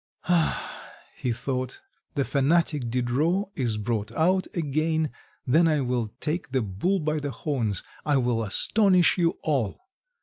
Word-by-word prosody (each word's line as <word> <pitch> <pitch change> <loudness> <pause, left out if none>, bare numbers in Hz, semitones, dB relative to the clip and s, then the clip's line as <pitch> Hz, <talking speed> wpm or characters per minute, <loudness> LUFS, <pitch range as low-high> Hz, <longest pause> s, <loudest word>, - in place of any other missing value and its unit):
"Ah," 175 -3 0 0.3
he 125 - -2
thought, 130 +1 -3 0.4
"the 140 - +2
fanatic 145 -2 +1
Diderot 140 - +1
is 120 -5 -1
brought 105 -1 -2
out 185 +4 +2
again, 155 -1 0 0.3
then 160 +6 +4
I 155 -3 +2
will 125 -3 0
take 155 -1 -2
the 130 -3 +2
bull 105 - 0
by 155 -1 -1
the 145 -1 -3
horns, 120 - -2 0.2
I 145 -2 +2
will 120 -3 +1
astonish 185 - +3
you 170 -1 +2
all." 135 -10 0
145 Hz, 140 wpm, -26 LUFS, 120-165 Hz, 0.4 s, then